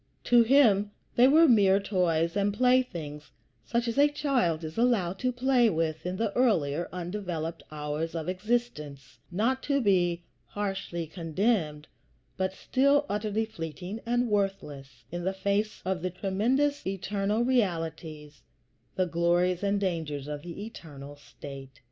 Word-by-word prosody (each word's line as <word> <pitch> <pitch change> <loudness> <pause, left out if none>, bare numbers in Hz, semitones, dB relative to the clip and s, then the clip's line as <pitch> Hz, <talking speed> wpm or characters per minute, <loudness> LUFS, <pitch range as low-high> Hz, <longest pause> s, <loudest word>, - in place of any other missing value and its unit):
To 240 -1 +5
him 225 -5 +4 0.3
they 245 +2 +6
were 320 +4 +6
mere 200 -6 +5
toys 170 -4 0
and 200 0 +1
playthings, 190 - 0 0.3
such 235 0 -1
as 235 +4 -1
a 290 - +7
child 250 - 0
is 155 0 -6
allowed 215 -7 +1
to 255 - 0
play 250 -1 +3
with 160 -2 -2
in 180 +1 -3
the 220 -2 -1
earlier, 170 - +1
undeveloped 175 -3 -4
hours 150 +2 -4
of 160 -1 -4
existence; 185 - -3
not 235 +9 0
to 280 -1 +1
be 175 -6 +2 0.2
harshly 195 -4 -4
condemned, 165 -1 -1 0.5
but 190 0 -1
still 280 +7 +2
utterly 210 +1 -1
fleeting 180 +1 -7
and 240 +1 +1
worthless 150 - -3
in 175 +1 -4
the 190 +2 0
face 200 +2 -1
of 185 -1 -1
the 185 - -1
tremendous 230 +11 0
eternal 200 +3 -1
realities, 165 - -2 0.5
the 185 - +1
glories 175 +1 +1
and 200 0 +1
the 200 - -1
dangers 155 -6 -3
of 150 -1 -5
the 175 +5 -7
eternal 145 -9 -10
state. 140 -1 -11
190 Hz, 140 wpm, -28 LUFS, 165-230 Hz, 0.5 s, a